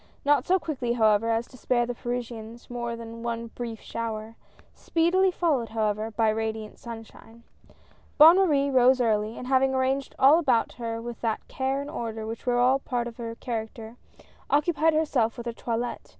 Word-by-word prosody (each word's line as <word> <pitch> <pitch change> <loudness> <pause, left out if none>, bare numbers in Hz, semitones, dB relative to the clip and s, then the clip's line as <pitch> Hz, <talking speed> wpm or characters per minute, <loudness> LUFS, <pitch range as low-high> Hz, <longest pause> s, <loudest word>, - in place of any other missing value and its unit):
Not 285 -2 +3
so 375 - +4
quickly, 260 -9 -2
however, 220 -1 +3
as 230 +1 +1
to 255 - -14
spare 240 -1 +1
the 245 - -3
Parisians 235 -1 -6
more 235 -1 -3
than 230 0 -9
one 230 0 -4
brief 230 -2 -6
shower, 225 -1 -5 0.4
speedily 350 +3 +2
followed, 300 -10 0
how 220 -1 0
ever, 215 +2 -4
by 225 0 +1
radiant 220 0 -3
sunshine. 230 0 -11 0.7
Bonne 320 +4 +9
Marie 290 -7 +2
rose 255 0 +5
early, 220 -2 0
and - - -7
having 265 0 +2
arranged 265 +1 -1
all 280 +5 +6
about 255 -8 +2
her 230 -1 -4
with 235 0 -7
that 225 -2 -2
care 270 +1 -2
and 285 - -7
order 225 -5 -4
which 225 +3 -7
were 245 0 +2
a 255 +2 +4
part 245 -3 -2
of 235 - -9
her 230 -1 -5
character, 225 -1 -6 0.5
occupied 310 +2 +2
herself 260 -7 +1
with 235 - -7
her 235 - -3
toilette. 235 +1 -4
240 Hz, 180 wpm, -26 LUFS, 225-265 Hz, 0.7 s, Bonne